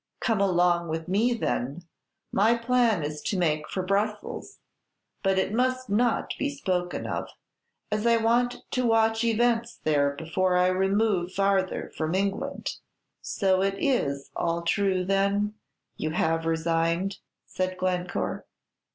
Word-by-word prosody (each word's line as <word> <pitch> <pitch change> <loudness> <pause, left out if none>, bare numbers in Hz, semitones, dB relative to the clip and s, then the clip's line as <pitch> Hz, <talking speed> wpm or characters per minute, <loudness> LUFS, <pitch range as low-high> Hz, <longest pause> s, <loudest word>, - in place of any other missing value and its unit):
"Come 225 -4 +1
along 175 -2 +3
with 160 0 -3
me, 210 +7 +2
then; 145 - -2 0.5
my 220 +4 +4
plan 230 -6 +2
is 150 0 -4
to 200 - -2
make 155 -3 0
for 185 - -2
Brussels, 205 +3 -2 0.6
but 195 -1 +2
it 190 +2 0
must 255 -1 0
not 235 +3 +1
be 285 - 0
spoken 185 -11 -2
of, - - -3 0.6
as 210 +2 0
I 230 0 +5
want 240 +2 +1
to 255 - 0
watch 225 0 +3
events 235 0 +1
there 145 -2 +2
before 180 +4 0
I 180 0 +4
remove 190 -1 +1
farther 195 -1 0
from 160 +2 -1
England." 200 +9 -2 0.4
"So 190 -2 +1
it 195 0 +1
is 140 - 0
all 170 0 -1
true, 190 0 +1
then, 200 +2 +1 0.4
you 155 - -2
have 165 0 0
resigned?" 165 +3 0 0.3
said 185 0 -3
Glencore. 180 -1 -2
195 Hz, 135 wpm, -27 LUFS, 175-225 Hz, 0.6 s, I